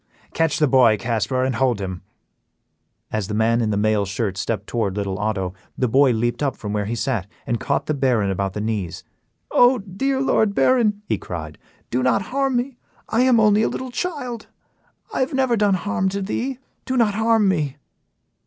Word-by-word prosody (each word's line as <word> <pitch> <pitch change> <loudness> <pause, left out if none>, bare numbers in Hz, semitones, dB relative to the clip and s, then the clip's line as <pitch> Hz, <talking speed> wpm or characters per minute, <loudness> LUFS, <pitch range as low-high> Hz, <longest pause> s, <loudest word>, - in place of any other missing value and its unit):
Catch 165 -2 +1
the 155 - +3
boy, 125 -5 +5
Casper, 120 +4 -1
and 130 0 0
hold 125 -4 +1
him." 95 -2 -5 1.1
As 110 -3 -2
the 105 - -3
man 115 +2 +2
in 110 - 0
the 105 - 0
mail 105 0 +2
shirt 100 0 -2
stepped 100 +1 -3
toward 105 -5 -2
little 100 -1 -2
Otto, 100 -4 -1 0.2
the 125 - +1
boy 135 +4 +4
leaped 120 +2 -1
up 140 -2 0
from 105 -1 -5
where 105 -1 -1
he 115 +3 -2
sat 110 -4 -1 0.2
and 120 -1 -1
caught - - -1
the 155 - -1
Baron 125 -8 +1
about 95 0 -2
the 105 - -4
knees. 105 -6 -3 0.5
"Oh! 245 +1 +5
dear 240 +7 -2
Lord 220 -6 +2
Baron," 215 -5 +2
he - - -1
cried, 80 -4 -7 0.3
"do 125 - +1
not 130 +8 +2
harm 275 -1 +1
me; 245 +1 -2 0.3
I 230 - +2
am 255 -2 +5
only 210 -1 +4
a - - +2
little 260 -1 -5
child, 250 -7 -4 0.7
I - - -1
have 260 +1 0
never 260 -3 +2
done 205 -3 +3
harm 190 0 -1
to 200 +1 -3
thee; 250 +6 -2 0.3
do 260 - -1
not 225 -4 +3
harm 220 0 +3
me." 150 -7 0
130 Hz, 195 wpm, -22 LUFS, -, 1.1 s, boy